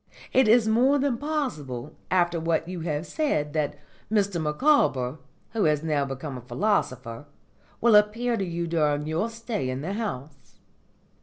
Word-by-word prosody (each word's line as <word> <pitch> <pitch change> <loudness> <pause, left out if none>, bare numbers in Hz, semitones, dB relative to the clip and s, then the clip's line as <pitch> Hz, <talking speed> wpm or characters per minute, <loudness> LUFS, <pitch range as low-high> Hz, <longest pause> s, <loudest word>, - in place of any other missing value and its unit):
It 260 -3 +5
is 225 0 +5
more 250 +6 +4
than 270 -4 0
possible, 155 - -3
after 175 -2 +2
what 165 0 0
you 180 -1 -5
have 160 -1 -2
said, 150 - -1
that 150 -2 -1 0.3
Mr 200 -5 +1
Micawber, 150 - +2 0.3
who 220 -2 +1
has 150 -1 +2
now 150 -3 +1
become 135 0 -6
a - - -11
philosopher, 130 - -1 0.5
will 230 -2 +5
appear 225 +4 +3
to 200 - -1
you 170 -1 -3
during 150 -3 +1
your 160 +9 -1
stay 230 - -4
in 130 +1 -3
the 180 +6 -3
house. 145 - -6
170 Hz, 155 wpm, -26 LUFS, 145-225 Hz, 0.5 s, It